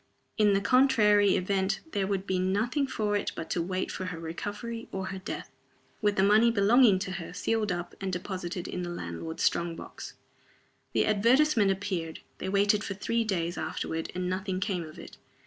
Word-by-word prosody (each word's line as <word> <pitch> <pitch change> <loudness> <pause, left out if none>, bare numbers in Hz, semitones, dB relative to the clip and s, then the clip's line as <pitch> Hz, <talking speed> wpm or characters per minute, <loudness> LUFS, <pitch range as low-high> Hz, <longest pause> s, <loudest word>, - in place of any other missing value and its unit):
In 210 -2 +4
the 195 - +2
contrary 210 -4 +5
event 195 +1 0
there 200 -2 0
would 195 -1 -1
be 190 -1 0
nothing 220 +10 +1
for 210 -4 -1
it 205 - -1
but 165 - -6
to 175 - +1
wait 185 +2 -2
for 185 - -4
her 180 -3 -5
recovery 205 +8 -5
or 190 -1 -3
her 190 0 -5
death 185 - -6 0.5
with 205 -1 +2
the 190 - +3
money 215 +4 +5
belonging 225 0 +5
to 185 0 -4
her 175 -2 -6
sealed 215 +2 0
up, 175 -1 -4
and 190 -1 -2
deposited 180 -1 -4
in 180 - -4
the 175 - -4
landlord's 160 - -5
strongbox. 170 -1 -2 0.8
The - - +3
advertisement 230 +2 +4
appeared. 190 -4 -2 0.2
They - - -3
waited 205 +2 +3
for 200 - -4
three 230 +4 0
days 175 -5 -2
afterward, 160 +1 -3
and 180 0 -2
nothing 185 +1 -2
came 190 -3 -1
of 155 - -12
it. - - -11
195 Hz, 180 wpm, -29 LUFS, 180-210 Hz, 0.8 s, contrary